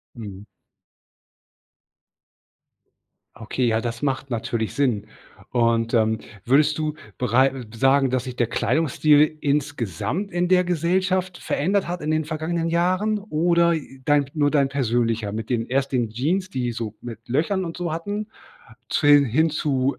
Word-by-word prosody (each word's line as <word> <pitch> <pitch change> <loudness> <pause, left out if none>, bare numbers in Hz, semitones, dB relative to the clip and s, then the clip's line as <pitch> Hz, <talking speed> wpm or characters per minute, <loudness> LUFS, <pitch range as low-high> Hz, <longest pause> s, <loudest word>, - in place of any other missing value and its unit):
Mhm. 105 -4 -8 2.9
Okay, 115 +3 -2
ja, 110 -1 +2
das 115 0 -4
macht 135 -1 -2
natürlich 115 -1 -2
Sinn. 120 -7 0 0.4
Und, 115 -1 +1
ähm, 110 -2 +2 0.2
würdest 150 +4 +3
du 155 -1 -1 0.2
berei 130 +1 +2
sagen, 135 +2 +3
dass 130 -1 0
sich 125 -2 -7
der 120 - +1
Kleidungsstil 155 +4 +2
insgesamt 145 - -2
in 175 0 0
der 180 0 +4
Gesellschaft 180 +1 0
verändert 190 +5 0
hat 175 0 -3
in 150 +1 -1
den 155 0 +1
vergangenen 160 +2 -2
Jahren 185 +6 +1
oder, 170 -3 +2
äh, 135 -4 -7
dein 145 0 +3
nur 145 -2 +2
dein 140 -3 +3
persönlicher? 115 -5 0
Mit 110 +2 -5
den 115 -2 0
erst 135 +1 0
den 120 -4 0
Jeans, 165 - -1
die 125 -9 -2
so 115 -2 -5
mit 115 -1 -9
Löchern 165 +9 0
und 165 -1 -6
so 175 -2 -3
hatten 205 +6 -4 0.6
zu 145 - 0
den 145 -1 +7
hin 155 +7 +2
zu 140 -4 0
140 Hz, 145 wpm, -23 LUFS, 120-165 Hz, 2.9 s, den